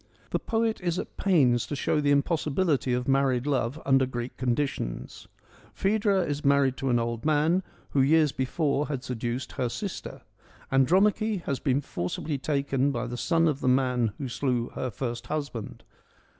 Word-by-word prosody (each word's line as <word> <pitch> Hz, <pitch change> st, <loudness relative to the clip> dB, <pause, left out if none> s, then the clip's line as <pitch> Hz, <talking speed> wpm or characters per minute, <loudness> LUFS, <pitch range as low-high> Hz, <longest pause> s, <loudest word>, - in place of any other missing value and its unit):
The -, -, +1 dB
poet 225 Hz, -1 st, -1 dB
is 175 Hz, -1 st, -1 dB
at -, -, -5 dB
pains 135 Hz, -, +3 dB
to 145 Hz, -, -3 dB
show 150 Hz, +2 st, 0 dB
the 145 Hz, -, +1 dB
impossibility 145 Hz, 0 st, +1 dB
of 125 Hz, 0 st, -1 dB
married 135 Hz, -2 st, +2 dB
love 135 Hz, 0 st, 0 dB
under 135 Hz, -1 st, +4 dB
Greek 120 Hz, -1 st, -5 dB
conditions. 125 Hz, -, -3 dB, 0.5 s
Phaedra 200 Hz, -1 st, +2 dB
is 145 Hz, -2 st, -3 dB
married 140 Hz, -2 st, +3 dB
to 135 Hz, -1 st, -2 dB
an 120 Hz, -, +3 dB
old 115 Hz, -1 st, -2 dB
man, 155 Hz, +4 st, +2 dB, 0.3 s
who 140 Hz, -, +3 dB
years 150 Hz, +2 st, +4 dB
before 140 Hz, +2 st, 0 dB
had 140 Hz, -4 st, -4 dB
seduced 120 Hz, +1 st, -3 dB
her 125 Hz, -, -2 dB
sister. 200 Hz, -, -6 dB, 0.5 s
Andromache 195 Hz, -, +3 dB
has 140 Hz, -, -2 dB
been 140 Hz, -1 st, +1 dB
forcibly 135 Hz, -, -3 dB
taken 140 Hz, -1 st, 0 dB
by 120 Hz, -2 st, -2 dB
the 120 Hz, 0 st, -5 dB
son 165 Hz, +5 st, +2 dB
of 145 Hz, -3 st, 0 dB
the -, -, -1 dB
man 125 Hz, -3 st, +2 dB
who 140 Hz, -, -4 dB
slew 120 Hz, 0 st, -1 dB
her 130 Hz, -, -4 dB
first 120 Hz, +1 st, -5 dB
husband. 140 Hz, -8 st, -5 dB
135 Hz, 165 wpm, -27 LUFS, 125-155 Hz, 0.5 s, under